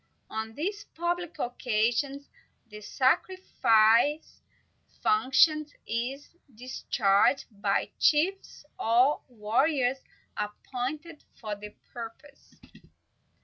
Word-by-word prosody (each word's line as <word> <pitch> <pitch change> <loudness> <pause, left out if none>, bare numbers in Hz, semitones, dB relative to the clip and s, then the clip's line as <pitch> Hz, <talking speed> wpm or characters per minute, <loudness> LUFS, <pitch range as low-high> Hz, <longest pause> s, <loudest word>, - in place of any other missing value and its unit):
On 220 0 -5
these 405 +6 -3
public 345 0 -2
occasions, 245 +3 -1 0.4
the 210 -1 -11
sacrificial 260 - +3 0.8
function 305 -6 +4 0.2
is 260 +8 -4 0.2
discharged 235 -1 +1 0.2
by 200 -2 0
chiefs, 330 +1 +1
or 245 +6 +3
by 250 - -24
warriors 255 +4 +1 0.4
appointed 265 +9 -5 0.2
for 215 -2 -4
the 210 +1 -11 0.2
purpose. 245 +5 -11
255 Hz, 80 wpm, -28 LUFS, 225-300 Hz, 0.8 s, function